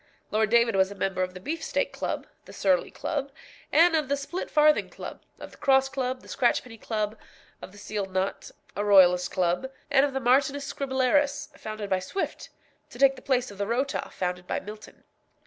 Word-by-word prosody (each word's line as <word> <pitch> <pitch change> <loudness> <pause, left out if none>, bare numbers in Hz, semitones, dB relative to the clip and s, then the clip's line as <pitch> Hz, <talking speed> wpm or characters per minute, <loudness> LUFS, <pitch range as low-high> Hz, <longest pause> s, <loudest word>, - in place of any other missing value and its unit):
Lord 215 0 +2
David 235 -1 +4
was 190 0 +3
a 200 - -9
member 190 -1 -1
of 185 0 -2
the - - -7
Beefsteak 320 - -2
Club, - - -3 0.2
the - - -12
Surly - - +2
Club, 280 -3 -3 0.4
and 330 +2 +5
of 305 -4 0
the 280 - +2
Splitfarthing 305 0 +2
Club, - - -9 0.2
of - - -9
the - - -16
Cross 270 -1 +3
Club, 260 -1 -3
the - - -15
Scratchpenny 240 -2 0
Club, 215 -1 -2 0.5
of - - -9
the 205 - -16
Sealed 205 -1 -4
Knot, 190 +1 -2 0.3
a 205 - -1
Royalist 180 -3 +5
Club, 180 +8 0 0.2
and 275 -1 +5
of 285 -1 0
the 270 - -1
Martinus 275 +3 +2
Scribblerus, 275 +2 0
founded 215 -1 -6
by 190 - +3
Swift, 380 - -4 0.4
to - - -12
take 270 +1 +5
the - - -12
place 255 -4 0
of 200 - -13
the 200 - -1
Rota, 260 +5 -1
founded 180 -1 -3
by - - -1
Milton. 210 +2 -11
245 Hz, 190 wpm, -27 LUFS, 200-275 Hz, 0.5 s, and